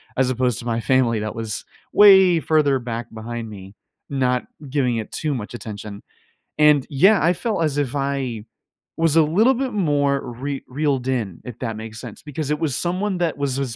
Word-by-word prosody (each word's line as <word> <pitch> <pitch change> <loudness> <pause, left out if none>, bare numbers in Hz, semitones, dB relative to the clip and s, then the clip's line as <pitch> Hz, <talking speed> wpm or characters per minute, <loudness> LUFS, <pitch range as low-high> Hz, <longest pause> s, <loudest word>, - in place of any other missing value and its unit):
as 130 -1 +2
opposed 125 -3 0
to - - -9
my 115 -1 -1
family 120 -2 +2
that 110 0 -4
was 110 -2 -4 0.3
way 190 -4 +7
further 150 -4 +2
back 120 -1 -6
behind 115 0 -6
me, 95 -1 -11 0.3
not 125 -2 0 0.2
giving 130 -3 +1
it 110 - -5
too 155 -2 -2
much 105 -2 -6
attention. 105 -3 -8 0.6
And, 150 -3 +5
yeah, 190 +9 +4
I 170 +3 +4
felt 195 -1 -1
as 145 -2 -1
if 145 -1 -1
I 135 -5 -2 0.5
was 165 -2 +2
a 165 - +6
little 205 +12 +3
bit 265 0 -2
more 145 -7 +1
re 140 +3 -4
reeled 135 -2 -1
in, 115 -9 -2
if 120 -3 -8
that 115 -3 -3
makes 110 0 -8
sense, 115 -5 -9
because 150 0 -5
it 150 - 0
was 155 -6 -1
someone 185 +2 -1
that 170 -4 0
was 140 -2 -1
as 130 -5 -3
135 Hz, 190 wpm, -22 LUFS, 115-155 Hz, 0.6 s, way